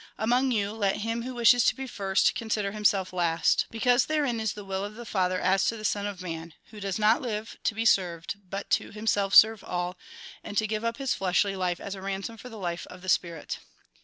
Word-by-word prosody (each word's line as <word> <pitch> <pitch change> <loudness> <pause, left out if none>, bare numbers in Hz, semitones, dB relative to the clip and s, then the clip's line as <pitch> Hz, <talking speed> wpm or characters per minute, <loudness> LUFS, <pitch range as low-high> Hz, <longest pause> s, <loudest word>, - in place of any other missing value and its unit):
Among 245 +5 +2
you, 205 -4 0
let 210 -2 -1
him 230 +1 -1
who 255 +1 -6
wishes 240 +1 +5
to - - +3
be 265 - -5
first, 195 -5 +1
consider 215 -3 -2
himself 200 -3 +1
last. 170 -2 +2
Because 245 +2 +2
therein 290 -7 0
is 220 -2 -1
the 205 -1 -9
will 195 0 -3
of 205 +1 -6
the 240 +1 -9
Father 185 -3 0
as 190 +1 +2
to 230 - 0
the 215 - -7
Son 205 0 0
of 195 -3 -6
Man; 165 -2 -6 0.2
who 215 - -10
does 195 -2 -2
not 215 +2 +3
live 220 -2 -4
to 225 - 0
be 225 +1 -2
served, 180 -3 +1
but 195 +2 -5
to - - +1
him 215 +1 -9
self 200 -2 +2
serve 220 -1 +7
all, 180 0 -3 0.5
and 205 - -6
to 220 - +3
give 215 +1 -2
up 230 0 -1
his 275 -2 0
fleshly 195 +1 +1
life 180 -2 -1
as 200 - -6
a 195 - -8
ransom 195 +3 -4
for 250 +4 -10
the 225 - -10
life 175 -3 -4
of 180 0 -12
the 185 - -5
spirit." 170 -4 -1
205 Hz, 235 wpm, -27 LUFS, 190-225 Hz, 0.5 s, serve